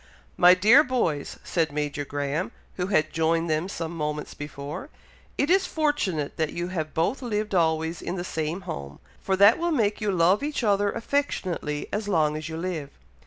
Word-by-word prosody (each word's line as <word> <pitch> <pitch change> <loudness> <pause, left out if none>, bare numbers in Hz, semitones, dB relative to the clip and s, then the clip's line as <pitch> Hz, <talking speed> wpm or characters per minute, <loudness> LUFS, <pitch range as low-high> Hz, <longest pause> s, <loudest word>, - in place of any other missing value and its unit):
"My 180 +1 +7
dear 220 +10 +7
boys!" 230 - -1
said 165 -3 0
Major 145 0 -2
Graham, 145 +4 -2 0.3
who 180 -1 -1
had 155 -6 +1
joined 165 0 +1
them 155 +4 0
some 165 -4 -4
moments 150 -1 -3
before, 150 - -7 0.5
"it 285 +4 +1
is 385 +1 +4
fortunate 260 - -1
that 160 -2 -1
you 175 +1 -3
have 160 -4 -4
both 170 +12 0
lived 215 -4 -2
always 160 -1 +1
in - - -3
the 175 - -3
same 160 +1 -3
home, 70 - -7 0.2
for 190 - 0
that 200 - +6
will 345 +1 0
make 220 -9 +1
you 210 -1 +1
love 180 +2 +3
each 290 -3 -2
other 205 -1 +2
affectionately 185 - -2
as 210 0 -2
long 155 -6 +2
as 155 0 -5
you 160 - -5
live. 165 -5 -3
175 Hz, 180 wpm, -26 LUFS, 155-210 Hz, 0.5 s, My